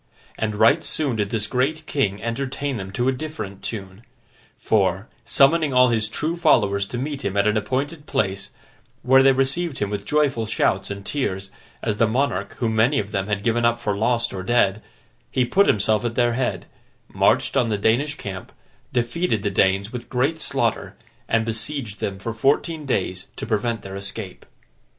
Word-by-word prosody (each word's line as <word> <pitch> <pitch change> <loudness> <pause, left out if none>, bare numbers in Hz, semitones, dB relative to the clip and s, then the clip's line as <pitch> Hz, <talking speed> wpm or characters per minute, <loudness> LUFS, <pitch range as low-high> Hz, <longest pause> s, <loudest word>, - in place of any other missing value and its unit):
And 110 -1 -2
right 115 +10 +4
soon 140 -7 -1
did 105 -2 -1
this 105 -1 -1
great 140 +7 -1
king 105 -9 -1
entertain 135 +3 -2
them 95 -2 -6
to 120 +5 0
a - - +4
different 125 -9 -6
tune; 100 -2 -6 0.6
for, 95 -1 +1 0.2
summoning 140 +4 +3
all 125 0 +6
his 110 -2 +1
true 155 +8 -2
followers 105 - +3
to 120 - -5
meet 140 +2 -4
him 100 +1 -2
at 100 - +3
an 105 0 +2
appointed 140 +8 -2
place, 95 -2 -1 0.5
where 130 +1 +6
they 135 0 +6
received 135 +4 0
him 105 -1 -2
with 100 -1 -3
joyful 140 -7 +1
shouts 110 - 0
and 100 0 -6
tears, 95 -9 -2 0.3
as 105 -2 -1
the 115 - +3
monarch 110 -5 -1
whom 115 -2 -1
many 120 +6 +3
of 105 -5 -2
them 100 -2 -1
had 105 -1 -2
given 120 +1 +1
up 120 0 +3
for 105 -3 -2
lost 115 +3 0
or 95 - -4
dead, 100 -1 +2 0.5
he 130 -2 +1
put 195 +12 +3
himself 105 +1 +2
at 115 -1 -2
their 120 -1 +2
head, 125 +1 -2 0.4
marched - - +2
on 125 -4 +2
the 105 - 0
Danish 125 +8 +1
camp, 95 -8 -7 0.4
defeated 120 - 0
the 100 - 0
Danes 95 +3 +1
with 120 -1 -6
great 135 +6 0
slaughter, - - -1 0.3
and 115 0 +1
besieged 115 -1 -4
them 100 -1 -3
for 115 +4 -5
fourteen 150 +6 0
days 95 -6 -1
to - - -5
prevent 115 +1 -1
their 95 0 -7
escape. 100 0 -7
115 Hz, 185 wpm, -23 LUFS, 100-135 Hz, 0.6 s, all